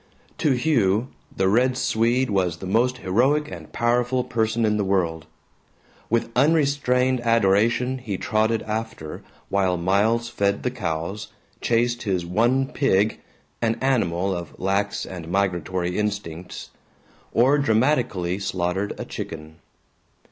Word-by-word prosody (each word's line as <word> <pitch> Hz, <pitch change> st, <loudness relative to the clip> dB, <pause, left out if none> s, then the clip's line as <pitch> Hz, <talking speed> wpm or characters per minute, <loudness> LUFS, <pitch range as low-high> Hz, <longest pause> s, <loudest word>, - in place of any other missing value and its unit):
To 150 Hz, -, +3 dB
Hugh, 125 Hz, -4 st, +1 dB, 0.3 s
the 95 Hz, -, +2 dB
Red 125 Hz, +5 st, +3 dB
Swede 125 Hz, 0 st, +1 dB
was 90 Hz, -4 st, 0 dB
the 95 Hz, -, -8 dB
most 120 Hz, +6 st, +1 dB
heroic 130 Hz, +10 st, +2 dB
and 80 Hz, -4 st, -9 dB
powerful 125 Hz, +2 st, +1 dB
person 110 Hz, 0 st, 0 dB
in 105 Hz, 0 st, +1 dB
the 105 Hz, -, +1 dB
world. 85 Hz, -5 st, 0 dB, 0.8 s
With 115 Hz, 0 st, 0 dB
unrestrained 135 Hz, -3 st, +2 dB
adoration 115 Hz, +3 st, +2 dB
he 105 Hz, -6 st, -4 dB
trotted 110 Hz, +2 st, 0 dB
after 110 Hz, -7 st, -5 dB, 0.3 s
while 95 Hz, -2 st, +1 dB
Miles 105 Hz, +7 st, +1 dB
fed 100 Hz, -3 st, -1 dB
the 125 Hz, -, 0 dB
cows, 95 Hz, -1 st, -4 dB, 0.3 s
chased 120 Hz, +1 st, +1 dB
his 95 Hz, -5 st, -1 dB
one 120 Hz, +9 st, +2 dB
pig 110 Hz, -7 st, +1 dB, 0.4 s
an 115 Hz, -1 st, +1 dB
animal 95 Hz, -8 st, +1 dB
of 85 Hz, -2 st, -8 dB
lax 100 Hz, +2 st, -1 dB
and 85 Hz, -3 st, -8 dB
migratory 90 Hz, -1 st, -1 dB
instincts 95 Hz, -5 st, -4 dB, 0.6 s
or 135 Hz, +5 st, +4 dB
dramatically 110 Hz, -8 st, +1 dB
slaughtered 95 Hz, +1 st, -2 dB
a -, -, -4 dB
chicken. 80 Hz, 0 st, -7 dB
110 Hz, 125 wpm, -23 LUFS, 95-125 Hz, 0.8 s, or